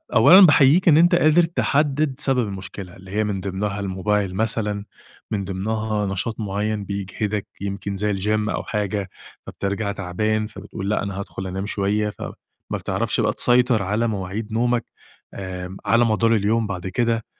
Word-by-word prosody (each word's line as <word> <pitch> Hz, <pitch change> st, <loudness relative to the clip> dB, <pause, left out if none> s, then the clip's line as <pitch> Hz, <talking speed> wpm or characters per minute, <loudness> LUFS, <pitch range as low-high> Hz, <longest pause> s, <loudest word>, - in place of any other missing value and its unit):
أولًا 190 Hz, +2 st, +9 dB
باحييك 150 Hz, +3 st, +5 dB
إن 155 Hz, -, +7 dB
أنت 175 Hz, +2 st, +5 dB
قادر 165 Hz, +1 st, +5 dB
تحدِّد 150 Hz, -3 st, +1 dB
سبب 125 Hz, -4 st, +1 dB
المشكلة، 95 Hz, -1 st, -7 dB
اللي 95 Hz, -1 st, -13 dB
هي 105 Hz, +2 st, +1 dB
من 100 Hz, -3 st, -2 dB
ضِمنها 100 Hz, +1 st, -3 dB
الموبايل 100 Hz, 0 st, -1 dB
مثلًا، 105 Hz, -1 st, -1 dB, 0.5 s
من 100 Hz, -2 st, -1 dB
ضِمنها 105 Hz, +2 st, -2 dB
نشاط 95 Hz, +4 st, -3 dB
معيّن 105 Hz, 0 st, -2 dB
بيجهدك، 100 Hz, +1 st, -3 dB
يمكن 100 Hz, 0 st, -4 dB
زي 105 Hz, +1 st, 0 dB
الGym 105 Hz, +2 st, 0 dB
أو -, -, -2 dB
حاجة، 105 Hz, -2 st, -2 dB, 0.4 s
فبترجع 100 Hz, +1 st, -2 dB
تعبان، 105 Hz, +3 st, -1 dB
فبتقول 100 Hz, -2 st, -7 dB
لأ 105 Hz, -, 0 dB
أنا 100 Hz, -1 st, -4 dB
هادخل 95 Hz, -1 st, -6 dB
أنام 95 Hz, +2 st, -4 dB
شوية 105 Hz, +1 st, 0 dB
ف -, -, -11 dB, 0.5 s
ما -, -, 0 dB
بتعرفش -, -, -1 dB
بقى -, -, +1 dB
تسيطر 120 Hz, -3 st, +3 dB
على 105 Hz, +5 st, 0 dB
مواعيد 105 Hz, +1 st, -4 dB
نومك 120 Hz, +1 st, +1 dB, 0.5 s
آمم، 95 Hz, -1 st, -6 dB
على 115 Hz, +4 st, +4 dB
مدار 115 Hz, +1 st, +3 dB
اليوم 110 Hz, +2 st, +1 dB
بعد 95 Hz, -2 st, -4 dB
كده، 115 Hz, +3 st, 0 dB
105 Hz, 160 wpm, -22 LUFS, 100-115 Hz, 0.5 s, أولًا